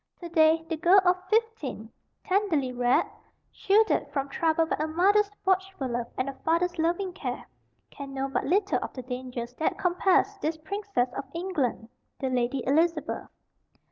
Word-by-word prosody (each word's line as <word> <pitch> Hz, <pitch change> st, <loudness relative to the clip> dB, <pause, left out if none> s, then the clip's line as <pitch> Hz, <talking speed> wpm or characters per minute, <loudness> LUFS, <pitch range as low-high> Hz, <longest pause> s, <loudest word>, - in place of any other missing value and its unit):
To 345 Hz, -, -7 dB
day 320 Hz, 0 st, +4 dB
the 325 Hz, -, -2 dB
girl 355 Hz, +4 st, +6 dB
of 365 Hz, 0 st, +2 dB
fifteen, 430 Hz, -, -1 dB, 0.3 s
tenderly 370 Hz, -10 st, +1 dB
reared, 245 Hz, 0 st, +2 dB, 0.5 s
shielded 420 Hz, -4 st, +2 dB
from 275 Hz, -1 st, -2 dB
trouble 325 Hz, +2 st, +1 dB
by -, -, -1 dB
a 310 Hz, -, 0 dB
mother's 400 Hz, +6 st, +3 dB, 0.2 s
watchful 380 Hz, -7 st, 0 dB
love 240 Hz, 0 st, -2 dB
and 255 Hz, -, -1 dB
a 275 Hz, -, -3 dB
father's 340 Hz, +1 st, +1 dB
loving 350 Hz, +3 st, 0 dB
care, -, -, -5 dB, 0.5 s
can 280 Hz, -1 st, -8 dB
know 270 Hz, 0 st, -2 dB
but 270 Hz, -, -1 dB
little 400 Hz, +3 st, +2 dB
of -, -, -5 dB
the 255 Hz, -, -7 dB
dangers 250 Hz, -1 st, -6 dB
that 315 Hz, -, 0 dB
compassed 380 Hz, +2 st, +2 dB
this 315 Hz, 0 st, -1 dB
princess 315 Hz, -7 st, -2 dB
of 275 Hz, -, -5 dB
England, 310 Hz, -11 st, -2 dB, 0.3 s
the 265 Hz, -, -2 dB
Lady 250 Hz, +1 st, 0 dB
Elizabeth. 325 Hz, +5 st, 0 dB
325 Hz, 160 wpm, -27 LUFS, 265-375 Hz, 0.5 s, girl